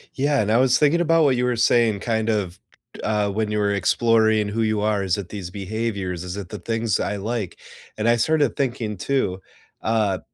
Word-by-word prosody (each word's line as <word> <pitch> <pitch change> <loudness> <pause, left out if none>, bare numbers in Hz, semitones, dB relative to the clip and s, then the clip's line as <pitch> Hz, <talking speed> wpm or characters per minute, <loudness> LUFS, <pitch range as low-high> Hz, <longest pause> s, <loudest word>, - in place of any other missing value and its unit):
Yeah, 140 +1 +1
and 105 0 0
I 115 - +4
was 130 0 +4
thinking 150 +3 +3
about 165 -1 +3
what 135 -3 +3
you 125 - +1
were 125 -1 +1
saying, 115 -2 +3
kind 110 -1 -1
of, 95 -5 -1 0.4
k - - -12
uh, 105 -1 0
when 110 +1 -1
you 105 - -1
were 100 -1 +1
exploring 110 +1 +2
who 110 +2 -2
you 110 -1 0
are, 105 -1 +1
is 95 -1 0
it 100 -3 -6
these 95 -4 -6
behaviors? 100 -2 -4
Is 90 0 -5
it 100 -3 -7
the 105 - -7
things 115 +2 -1
I 105 - -2
like? 105 -1 -4 0.4
And 110 +2 +1
I 120 - +4
started 145 +1 +1
thinking 120 -6 -2
too, 95 -4 -1 0.4
uh, 105 -4 0
110 Hz, 215 wpm, -22 LUFS, 100-120 Hz, 0.4 s, I